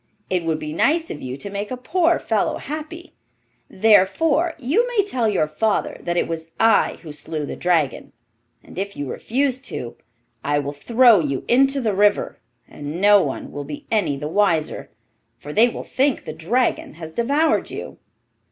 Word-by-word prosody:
It 180 -2 +1
would 160 -1 0
be 150 0 -6
nice 320 - +1
of 150 - -7
you 130 +1 -5
to 200 +6 -6
make 205 +1 -4
a 255 - -4
poor 340 +6 +2
fellow 220 -2 0
happy; 315 +4 -7 0.6
therefore 275 - +3
you 315 - +1
may 455 -5 +1
tell 245 - 0
your 190 -7 +1
father 205 +8 -1
that 175 0 -2
it - - +1
was 165 0 -5
I 225 0 +3
who 160 - -8
slew 150 0 -5
the - - -6
dragon, 165 -6 0 0.5
and - - -9
if 200 +1 -4
you 145 - -4
refuse 260 - -1
to, 230 - -6 0.5
I 145 +1 +1
will 145 0 -2
throw 235 - +5
you 140 -5 -2
into 270 +3 +3
the 220 -5 0
river, 205 +1 +2 0.3
and 145 +3 -7
no 205 0 +6
one 135 -5 -4
will 145 - -5
be 145 +1 -8
any 205 -11 +1
the 150 +2 -4
wiser, 165 -3 0 0.5
for 150 - -9
they 230 +6 +5
will - - -7
think 270 0 0
the 155 - -5
dragon 175 +6 -1
has 160 -1 -9
devoured 285 - +1
you. - - -8
205 Hz, 180 wpm, -21 LUFS, 155-260 Hz, 0.6 s, no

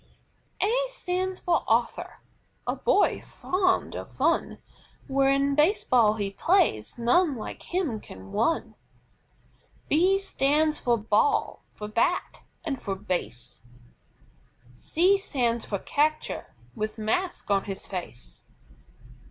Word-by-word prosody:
C. - - +2
A - - +1
stands 370 -5 -2
for 345 -2 +1
ARTHUR, 230 +1 0 0.4
a - - -1
boy 410 - +2
fond 370 0 0
of - - -7
fun, - - 0 0.5
When 275 +1 +2
Base 305 +9 +3
Ball 225 -4 +4
he 200 -2 -2
plays, 195 - +1
none 280 +6 +3
like 215 - -7
him 335 - 0
can 95 - -12
run. 230 +10 0 1.2
B 365 +6 +4
stands 305 -4 +1
for 240 -1 +2
BALL, 225 - +1
for 210 - -8
BAT, 230 +12 0 0.2
and 285 -6 -3
for 195 -2 -3
BASE. 175 - -4 1.1
C 360 - +2
stands 240 - -1
for 200 - -2
CATCHER, 305 +9 -1 0.3
with 215 - -4
mask 225 - -2
on 195 -1 +2
his 195 -1 -6
face. 120 - -6
270 Hz, 120 wpm, -27 LUFS, -, 1.2 s, Ball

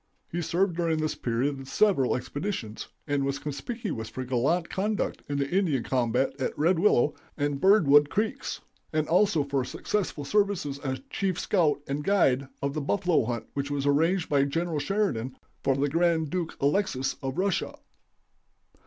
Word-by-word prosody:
He 175 - -2
served 175 +2 0
during 165 -2 +1
this 155 0 -1
period 130 +4 -1
with 135 - -9
several 160 -4 +3
expeditions, 130 - -4 0.2
and 145 -2 0
was 140 0 -1
conspicuous 150 - -5
for 130 - -5
gallant 140 +8 +1
conduct 210 +2 -2
in 145 - -1
the 140 -1 0
Indian 165 -7 +1
combat 130 +1 +1
at 130 - -2
Red 165 +3 +3
Willow 150 -7 +4 0.2
and 145 -1 -1
Birdwood 150 -8 +6
creeks, 220 - -2 0.3
and 155 -1 0
also 180 -3 +3
for 140 -1 -1
successful 160 +1 -3
services 195 -7 0
as 130 -2 -3
chief 190 -3 -1
scout 160 -7 +2
and 140 +2 -2
guide 140 -9 +3 0.2
of 140 0 0
the 155 - -2
buffalo 180 - +1
hunt 120 -1 -3
which 140 0 -2
was 145 -1 -2
arranged 165 +5 +2
by 140 -2 +3
General 165 +2 -1
Sheridan 140 - -1 0.3
for 135 - +2
the 140 +2 +1
Grand 165 0 +1
Duke 175 -3 -3
Alexis 140 -3 +1
of 135 -1 -4
Russia. 190 -1 0
145 Hz, 160 wpm, -27 LUFS, 135-180 Hz, 0.3 s, Birdwood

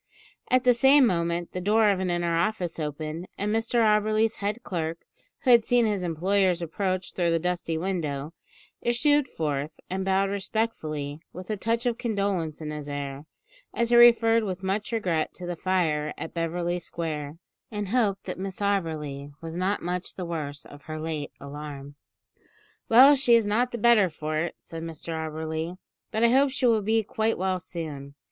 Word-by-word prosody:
At 255 0 +3
the 250 -2 +6
same 270 +3 +6
moment 170 -3 0
the 180 - -4
door 210 +2 +4
of 195 - 0
an 190 -1 -1
inner 175 -1 0
office 175 -1 -1
opened, 155 +3 -4
and 210 +1 -1
Mr 225 +2 -1
Auberly's 215 +1 +2
head 210 +4 -3
clerk, 165 -2 -4 0.4
who 255 - +3
had 235 -2 +7
seen 245 0 +3
his 205 -3 0
employer's 180 +2 +1
approach 185 +2 -2
through 175 -2 +1
the 165 - +3
dusty 170 -1 -2
window, 160 -5 -3 0.5
issued 270 +4 +2
forth 150 - -2 0.2
and 190 +1 -1
bowed 195 +1 +1
respectfully, 160 -8 -3
with 185 +4 -7
a - - 0
touch 230 +4 -1
of 240 -1 0
condolence 195 -9 -1
in 150 -1 -4
his 150 -1 -6
air, 140 +1 -5 0.5
as 235 0 0
he - - +6
referred 230 -1 +6
with 190 -2 -4
much 200 +4 -2
regret 180 -9 -1
to 180 - -7
the 175 0 -3
fire 160 -5 0
at - - -6
Beverly 175 +1 -1
Square, 155 -3 -5 0.3
and 210 -3 -4
hoped 205 -4 +1
that - - -6
Miss 195 0 -5
Auberly 155 -8 -2
was 165 0 -7
not 185 +3 -1
much 180 +1 -3
the 185 - -4
worse 150 -4 -5
of 145 - -13
her 155 0 -5
late 155 -2 -4
alarm. 140 0 -8 1.0
"Well, 260 +5 +9
she 250 -3 +4
is 230 -2 +3
not 235 +5 +1
the 240 - -3
better 225 -4 +5
for 155 0 -3
it," 170 +2 -2
said 165 0 -9
Mr 165 0 -6
Auberly; 160 +2 -4 0.3
"but 220 - -1
I 235 - +6
hope 270 +2 +4
she 265 0 -1
will 225 -3 +4
be 220 +2 +2
quite 220 +2 -1
well 185 0 0
soon. 150 -6 -7
180 Hz, 180 wpm, -26 LUFS, 160-215 Hz, 1.0 s, Well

